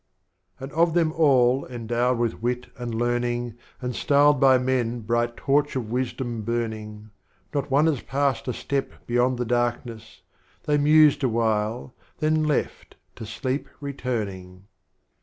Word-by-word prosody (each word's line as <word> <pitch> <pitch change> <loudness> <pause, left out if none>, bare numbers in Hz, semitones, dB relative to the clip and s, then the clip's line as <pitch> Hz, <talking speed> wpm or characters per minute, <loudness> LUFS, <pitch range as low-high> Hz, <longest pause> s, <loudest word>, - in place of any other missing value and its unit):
VIII. - - -12
And 135 - -11
of 165 +1 +2
Them 165 -2 +3
All 135 -4 +4
endowed 120 +1 -1
with 115 -2 -2
Wit 125 +1 -2
and 120 -2 -5
Learning, 120 0 -1 0.3
And 125 -1 -3
styled 145 0 +4
by 130 -1 +6
Men 125 -2 -1
'bright 120 +2 -1
Torch 145 +1 +1
of 115 -4 -3
Wisdom 125 -2 -3
burn 115 +1 -1
ing,' 105 0 -10 0.4
Not 145 0 -2
One 140 +3 +3
has 155 -6 +1
passed 140 0 -1
a 125 - -1
Step 140 +2 -3
beyond 120 +1 +1
the 125 - -2
Darkness, 120 -1 -3 0.4
They 150 -1 +1
mused 150 0 +5
a 130 - +3
while, 110 +2 -1 0.2
then 155 0 +1
left, 150 -2 -2 0.2
to 110 - -8
Sleep 130 +5 -3
returning. 105 -10 -5
125 Hz, 150 wpm, -24 LUFS, 115-140 Hz, 0.4 s, by